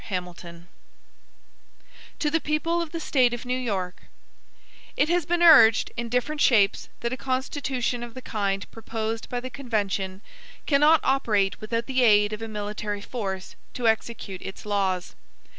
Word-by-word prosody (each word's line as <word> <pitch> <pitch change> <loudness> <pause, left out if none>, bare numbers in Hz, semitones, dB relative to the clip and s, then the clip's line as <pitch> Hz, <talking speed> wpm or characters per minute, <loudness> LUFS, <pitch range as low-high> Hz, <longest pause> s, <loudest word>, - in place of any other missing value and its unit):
HAMILTON 175 -3 -6 1.5
To 295 - 0
the 325 - +2
People 330 +3 0
of 330 -2 -5
the 335 - -4
State 255 -6 +2
of 240 - -9
New 250 0 -1
York: 200 -8 -3 1.0
IT 295 - +2
HAS 345 -2 +1
been 345 0 +1
urged, 250 -10 +7
in 235 0 -4
different 285 +5 -1
shapes, 205 -5 +3
that 235 +1 -2
a - - -3
Constitution 260 -2 -2
of 240 -1 -8
the 255 - -7
kind 200 -2 -2
proposed 225 0 -4
by 245 - -2
the 255 +1 -7
convention 200 -7 -2 0.4
cannot 300 +2 +5
operate 215 -8 +1
without 230 +2 -2
the 260 -1 0
aid 210 -3 +5
of 215 - -5
a 225 - -4
military 210 -1 -4
force 195 -5 -5 0.2
to 240 -2 0
execute 220 -3 -1
its 190 - -8
laws. 195 -3 -1
230 Hz, 155 wpm, -25 LUFS, 205-260 Hz, 1.5 s, urged